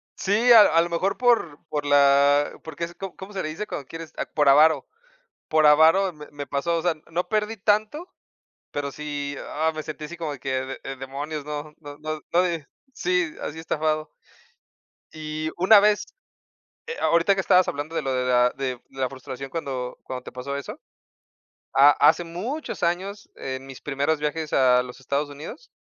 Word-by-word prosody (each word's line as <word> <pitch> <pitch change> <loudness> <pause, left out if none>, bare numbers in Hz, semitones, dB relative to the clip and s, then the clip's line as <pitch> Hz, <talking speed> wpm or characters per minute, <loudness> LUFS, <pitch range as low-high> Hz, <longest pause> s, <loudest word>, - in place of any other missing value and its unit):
Sí, 220 +5 +2
a 225 -2 +10
a 165 +1 +4
lo 170 - -2
mejor, 185 +4 -1
por 235 -12 +2
por 145 -1 -2
la 145 0 +4
porque 160 +1 -7
es, 170 - -11
¿co 195 -2 -7
cómo 190 +2 -10
se 190 - -2
le 155 - -3
dice 210 +7 -5
cuando 140 -2 -6
quieres?, 165 -1 -9 0.2
por 145 -2 +4
avaro, 155 +3 +5 0.6
por 155 -1 +4
avaro 160 +5 +5
me 150 -1 -11
me 145 -1 -7
pasó, 165 +4 -1
o - - -1
sea, 175 -2 +1 0.2
no 175 +2 -1
perdí 215 0 -1
tanto, 215 - 0 0.6
pero 140 -1 -3
sí, 145 -1 -5 0.2
ah, 160 +2 0
me 155 -1 -5
sentí 155 -1 -6
así 170 +2 -9
como 155 -3 -4
que 135 - -6 0.2
de: 135 - -7
"Eh, 135 - -5
demonios", 140 +3 -5
no 150 0 -6
no 145 -2 -10
no 155 0 -5
no 175 - +5
de 170 -5 -2 0.3
Sí, 180 -5 0
así 160 +2 -5
estafado. 155 -1 -1 1.0
Y 155 0 -4
una 200 +4 +7
vez, 210 0 +3 0.8
eh, 470 +1 -5
ahorita 170 +4 +3
que 190 - -1
estabas 185 -1 +4
hablando 145 +3 -4
de - - -1
lo 135 - -2
de 125 0 0
la 125 0 +4
de 130 -2 -3
de 135 - -11
la 130 - +1
frustración, 135 0 -8
cuando 130 -6 -4
cuando 130 -1 -6
te - - -9
pasó 135 +3 -5
eso, 140 - -7 0.9
ha 140 +2 +7
hace 160 +5 +4
muchos 215 - -5
años, 195 +5 -2
en 130 0 -6
mis 135 - -11
primeros 145 +2 -1
viajes 150 +1 -3
a 125 -2 +5
los 125 +1 -10
Estados 140 +3 -2
Unidos, 150 - -10
155 Hz, 190 wpm, -24 LUFS, 140-175 Hz, 1.0 s, a